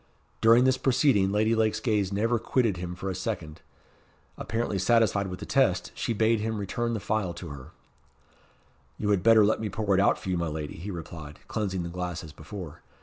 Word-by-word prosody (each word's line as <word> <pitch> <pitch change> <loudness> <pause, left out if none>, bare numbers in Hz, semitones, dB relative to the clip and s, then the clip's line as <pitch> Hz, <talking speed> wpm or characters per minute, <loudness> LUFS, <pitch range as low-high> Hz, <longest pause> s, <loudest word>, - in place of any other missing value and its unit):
During 115 +2 +6
this 130 0 +3
proceeding 125 -7 +3
Lady 110 +2 +2
Lake's 110 -1 +1
gaze 105 -5 0
never 115 +4 +1
quitted 115 -4 +1
him 90 0 -5
for 95 - -6
a - - -3
second. 90 -5 -5 0.7
Apparently 115 -4 -2
satisfied 105 -1 +3
with 90 -1 -6
the - - -6
test, - - +1
she - - -3
bade 110 +1 +2
him 110 +1 -2
return 115 +4 -2
the - - -2
phial 100 -4 -1
to 85 - -8
her. 70 -3 -9 1.3
"You 105 -1 0
had 100 -3 +2
better 110 0 +6
let 110 - +2
me 110 - -2
pour 100 0 -1
it 95 - +4
out - - +3
for - - -7
you, 90 -2 0
my 85 - -1
lady," 75 -1 -5
he 95 +5 -7
replied, 80 -4 -8
cleansing 95 -5 -2
the 85 - -5
glass 90 -1 -4
as 80 -3 -10
before. 85 -3 -9
100 Hz, 205 wpm, -27 LUFS, 90-110 Hz, 1.3 s, During